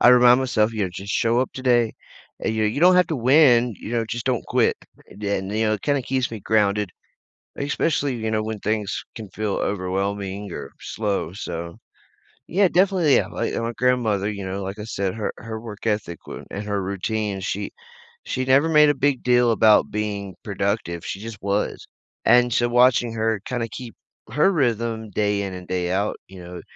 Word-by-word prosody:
I - - +7
remind 125 0 +7
myself, 115 -4 +1
you 110 -3 -1
know, 90 - -3
"Just 100 +3 -5
show 115 +2 +2
up 130 - -1
today," 120 -3 +2 0.5
and, - - -1
you 110 - 0
know, 105 - +3
you 115 - -3
don't 180 +1 +7
have 180 - +4
to 160 - -1
win, 125 -3 +5
you - - -8
know, 115 -1 +1
just 120 0 -4
don't 125 -3 0
quit, - - +2 0.3
and - - -14
then, 100 -2 -2
you 110 +1 0
know, 110 - +2
it 100 - -7
kinda 145 -1 +1
keeps 130 -1 -1
me 115 - -5
grounded, 105 -2 +1 0.7
especially, 145 -1 0
you 110 -1 -2
know, 110 0 0
when 110 -1 -4
things 105 -1 -2
can 110 -3 -7
feel 105 -2 -2
overwhelming, 100 +1 -2
or, - - -6
slow, 105 -5 -2
so. 85 -3 -6 0.7
Yeah 195 +2 +3
definitely, 180 -5 +3
yeah, 95 - +2
like, 105 - -3
my 115 0 -2
grandmother, 115 -6 +1
you 100 -2 -5
know, 95 +1 -4
like 95 +2 -5
I 105 - -6
said, 100 -4 -2
her 110 -1 -3
her 110 -1 -6
work 110 -1 -7
ethic 105 -6 -1
w - - -8
and 105 +1 -5
her 100 -1 -1
routine, 100 +1 -2
she 95 - -3 0.5
she 130 - -2
never 135 +5 +4
made 150 -1 +6
a 145 - +3
big 140 -1 0
deal 125 -1 +4
about 110 -1 +4
being 100 -2 -3
productive, 100 -4 -2
she 95 - -4
just 110 0 -7
was. 100 +1 -1 0.4
And, 120 0 +5
so 120 0 +2
watching 120 -1 +4
her 110 -2 0
kinda 125 -3 -2
keep 120 0 -9 0.3
her 170 +7 +3
rhythm, 115 - -1
day 105 0 0
in 95 -2 -4
and 90 -1 -9
day 90 -1 -1
out, 100 +3 0
you 95 -1 -11
know, 90 0 -9
110 Hz, 200 wpm, -23 LUFS, 100-125 Hz, 0.7 s, I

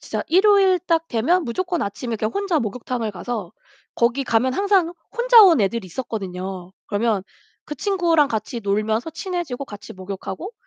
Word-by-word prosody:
진짜 - - -4
일요일 385 0 +5
딱 330 -2 0
되면 325 +11 +1
무조건 350 +5 -2
아침에 225 +3 -4
그냥 215 +1 -2
혼자 390 -5 0
목욕탕을 230 0 -3
가서 205 -2 -5 0.4
거기 240 +3 +1
가면 250 +2 +2
항상 390 -4 +2 0.2
혼자 475 -2 +7
온 340 - +6
애들이 200 0 -1
있었거든요. 185 -4 -6
그러면 210 -1 0 0.4
그 300 - -6
친구랑 335 -4 +2
같이 220 +2 -3
놀면서 215 +7 -1
친해지고 330 -6 -4
같이 205 -3 -10
목욕하고 195 - -7
245 Hz, 355 characters per minute, -22 LUFS, 210-350 Hz, 0.4 s, 혼자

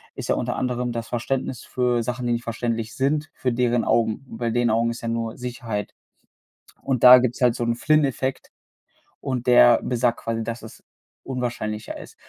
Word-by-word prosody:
ist - - -6
ja - - +3
unter - - -2
anderem 125 -1 -2
das 115 -1 -4
Verständnis 125 +1 -3
für 125 -2 0
Sachen, 125 +1 -3
die 120 - +1
nicht 120 - -2
verständlich 115 -1 -3
sind, 145 +3 0
für 125 - -2
deren 120 -1 +1
Augen. 115 +2 +1
Und 115 - -8
bei 120 -1 -1
den 120 0 +1
Augen 115 +1 +2
ist 115 - -7
ja 115 - -3
nur 115 0 -3
Sicherheit. 120 -4 -5 0.9
Und 130 -4 -1
da 125 0 +11
gibt's 125 0 -1
halt 120 -2 +4
so 120 - -2
'n 115 0 0
Flynn-Effekt 135 -1 0 0.7
und 125 -2 -3
der 120 -1 +6
besagt 120 -1 0
quasi, 115 0 -3
dass 115 +1 -5
es 110 - -13 0.4
unwahrscheinlicher 120 -4 -4
ist. - - -12
120 Hz, 185 wpm, -23 LUFS, 115-125 Hz, 0.9 s, da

